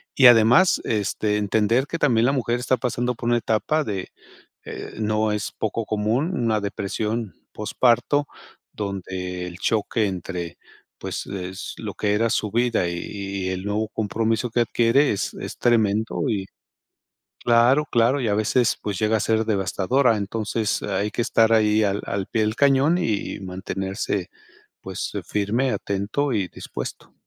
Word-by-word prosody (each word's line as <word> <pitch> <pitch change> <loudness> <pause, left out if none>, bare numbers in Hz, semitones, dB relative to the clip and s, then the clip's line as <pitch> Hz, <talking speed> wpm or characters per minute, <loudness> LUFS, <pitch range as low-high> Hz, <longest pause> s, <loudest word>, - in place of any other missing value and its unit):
Y 135 - +8
además, 120 +10 +6
este, 105 0 0
entender 110 +6 +1
que 165 - -3
también 120 -4 +3
la - - +3
mujer 120 -2 0
está 125 +1 +1
pasando 125 0 -1
por 120 - -3
una 120 - +3
etapa 135 +8 0
de, 100 -7 -4 0.5
eh, - - -7
no 110 0 +1
es 105 0 -2
poco 110 +1 -2
común, 110 - 0
una 115 -8 +1
depresión 105 +2 -3 0.2
posparto 120 +6 +2 0.5
donde 90 -3 -4
el 85 - -8
choque 110 0 +1
entre 90 -2 -5 0.4
pues, - - -5
es 95 -1 -6
lo - - -5
que 105 -1 0
era 115 +2 +2
su 105 -1 -1
vida 120 -5 +1
y - - -3
y 100 -1 -4
y - - 0
el 95 0 -3
nuevo 105 +1 -1
compromiso 110 +2 -1
que 120 - +2
adquiere 120 +5 +3
es 100 - -2
es - - -6
tremendo 110 -2 +1
y 100 -4 -1 1.0
Claro, 120 +5 +4
claro. 120 +4 +3
y 120 - -1
a 105 - +2
veces, 110 +3 +2
pues 100 -3 -3
llega 110 +1 +2
a - - -3
ser 110 +1 +1
devastadora. 110 +5 +2
Entonces 105 +1 -2
hay 100 +1 -1
que - - -2
estar 115 0 +3
ahí 110 -1 +4
al 100 0 0
al 100 -1 -3
pie 110 - 0
del 110 +1 -1
cañón 140 +5 +4
y 110 - -1
y - - -11
mantenerse, 95 0 -3 0.5
pues, - - -5
eh, - - -3
firme, 110 +6 0
atento 105 +9 -1
y 100 -5 0
dispuesto. - - -7
110 Hz, 165 wpm, -23 LUFS, 100-120 Hz, 1.0 s, Y